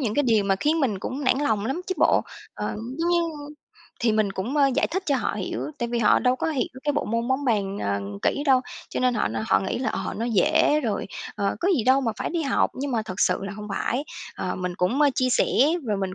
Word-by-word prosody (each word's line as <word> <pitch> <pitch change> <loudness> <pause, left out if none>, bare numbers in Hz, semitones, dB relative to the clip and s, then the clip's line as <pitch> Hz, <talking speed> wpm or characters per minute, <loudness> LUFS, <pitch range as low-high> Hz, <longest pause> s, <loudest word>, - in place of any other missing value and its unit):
những 220 -6 -1
cái 290 - +3
điều 225 -6 +3
mà 195 -1 +2
khiến 310 +9 +1
mình 225 -9 0
cũng 265 +8 -4
nản 255 0 +3
lòng 220 -8 0
lắm 270 +8 -2
chứ 375 - -1
bộ. - - +4 0.3
Ờ, - - -3 0.2
giống 335 +1 +1
như 345 0 +3 0.8
thì 230 -2 +2
mình 215 -2 +1
cũng, 225 +10 -3
ơ, 285 -2 +5
giải 285 - +2
thích 380 +4 -3
cho 280 - +2
họ - - -1
hiểu, - - -4
tại 235 - -2
vì 240 0 -1
họ 215 -3 +5
đâu 250 0 +2
có - - -2
hiểu 275 -5 0 0.2
cái 290 - +2
bộ 290 - -1
môn 230 +2 -1
bóng 265 +2 0
bàn, 200 -5 0
ờ, 100 0 -1 0.2
kỹ 285 - +1
đâu, 265 -2 +5 0.3
cho - - -3
nên 250 -1 +2
họ 215 - +1
nó 110 +1 -3
họ 95 - +4
nghĩ 95 - -2
là, 250 - -1
ờ, - - -3
nó 225 - -2
dễ 290 - +3
rồi, 220 -7 -2 0.3
ờ, 200 -1 -1
có 355 - +1
gì 230 - 0
đâu 260 +2 +5
mà 230 -4 -1
phải - - -3
đi 335 -1 -1
học, 275 - +1
nhưng 280 +2 -3
mà 225 - +1
thật 200 -4 -6
sự - - +3
là 200 - -4
hông 210 +1 -8
phải. 245 +7 -1 0.3
Ờ, - - -2
mình 180 -1 -3
cũng, 205 +11 +1
ơ, 290 -1 +5
chia 255 - +1
sẻ - - +3 0.4
và 210 -2 0
mình 190 -1 -3
240 Hz, 270 wpm, -25 LUFS, 205-280 Hz, 0.8 s, ơ